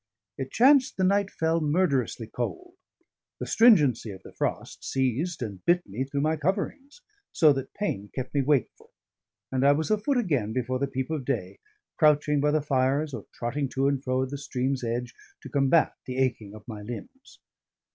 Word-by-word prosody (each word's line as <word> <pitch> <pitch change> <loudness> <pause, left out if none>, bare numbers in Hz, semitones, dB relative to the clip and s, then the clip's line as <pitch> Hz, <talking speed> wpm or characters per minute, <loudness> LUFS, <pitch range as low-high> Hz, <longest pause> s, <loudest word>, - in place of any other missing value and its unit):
It 135 +2 -5
chanced 265 - +4
the 190 - +1
night 200 +1 +2
fell 165 -1 0
murderously 145 - +1
cold; 355 - -5 0.7
the - - -3
stringency 150 - +4
of 95 -2 -9
the - - -13
frost - - -3
seized 135 +4 -1
and 100 -5 -7
bit 175 +1 +2
me 115 +7 -3
through 140 +1 -2
my 155 +2 +1
coverings, 210 - -3 0.3
so 155 -3 +5
that 135 -1 -5
pain 105 - -3
kept 130 -1 -4
me 140 - +2
wakeful; 135 -3 -1 0.6
and 130 0 0
I 140 +1 +6
was 160 +6 -1
afoot 215 +6 +1
again 140 - 0
before 130 +1 -1
the 140 - 0
peep 130 +1 -4
of 155 -4 -2
day, 100 -8 -3 0.4
crouching 150 -1 +3
by 150 - +2
the 150 0 +1
fires 140 +1 +1
or - - -7
trotting 135 +4 -2
to 135 +1 +2
and 140 -1 0
fro 130 0 0
at 130 - -5
the 140 - -4
stream's 130 -1 -2
edge, 120 +1 -3 0.3
to - - -8
combat 140 +3 +3
the 130 0 -4
aching 115 -6 -1
of 110 - -13
my 110 -3 -7
limbs. 250 - -10
140 Hz, 185 wpm, -27 LUFS, 125-160 Hz, 0.7 s, I